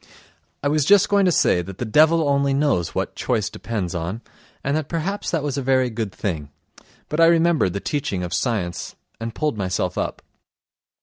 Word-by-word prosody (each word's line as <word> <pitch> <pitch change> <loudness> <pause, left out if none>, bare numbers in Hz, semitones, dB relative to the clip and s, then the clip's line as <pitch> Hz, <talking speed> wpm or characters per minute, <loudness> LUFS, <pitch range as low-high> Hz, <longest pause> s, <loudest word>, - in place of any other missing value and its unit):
I - - +2
was 150 +1 +2
just 200 +6 +5
going 200 -1 +4
to 180 - +4
say 90 - +3
that 95 +1 -9
the 125 - -3
devil 155 +7 +4
only 140 -1 +2
knows 140 - +1
what - - -2
choice 110 -5 -1
depends 100 -7 -4
on, 90 +6 -4 0.4
and 140 +1 0
that 155 -2 -2
perhaps 180 +5 -2
that 165 -4 -1
was 145 -2 -2
a - - -2
very 130 -1 +2
good 110 -3 -3
thing, 80 -7 -4 0.6
but 150 - -3
I 165 - +7
remembered 165 - +3
the 100 - -3
teaching 105 -11 -2
of 90 - -4
science... 95 -9 -2 0.2
and 115 0 -5
pulled 150 -8 -1
myself 90 -1 -1
up. - - -3
130 Hz, 190 wpm, -22 LUFS, 95-155 Hz, 0.6 s, I